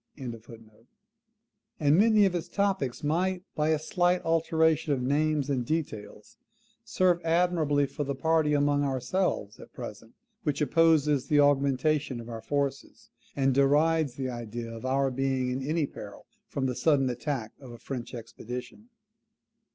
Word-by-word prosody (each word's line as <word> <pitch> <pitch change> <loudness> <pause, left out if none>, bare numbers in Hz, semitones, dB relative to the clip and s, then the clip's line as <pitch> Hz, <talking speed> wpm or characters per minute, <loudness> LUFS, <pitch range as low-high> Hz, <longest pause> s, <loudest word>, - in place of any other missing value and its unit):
] - - -24 1.6
and 145 0 +4
many 215 +2 +5
of 190 - +1
its 175 -1 -3
topics 190 -13 -1
might, 180 +4 0
by 150 0 0
a 160 - +3
slight 175 +3 +1
alteration 160 -2 +2
of 135 - -1
names 145 +1 +1
and 135 -4 0
details, 120 -8 -5 0.5
serve 180 -2 +1
admirably 165 -4 +2
for 145 - -4
the 140 0 -3
party 155 +1 +2
among 145 0 +2
ourselves 135 - -1
at - - -13
present - - -9 0.3
which 145 -2 -1
opposes 150 -2 +3
the 150 - +3
augmentation 140 -1 +2
of 115 0 -9
our 115 -1 -6
forces, 140 +3 -3 0.2
and 135 -1 +2
derides 145 +1 +3
the 130 -1 -3
idea 120 -1 -6
of 115 +3 -6
our 135 0 +1
being 130 -1 -1
in 130 +1 -3
any 155 +3 0
peril - - -10 0.2
from 135 - -3
the 130 - 0
sudden 140 0 +2
attack 125 -2 -3
of 135 -3 -12
a 120 - -10
French 125 0 -6
expedition. 125 - -8
145 Hz, 150 wpm, -28 LUFS, 130-160 Hz, 1.6 s, many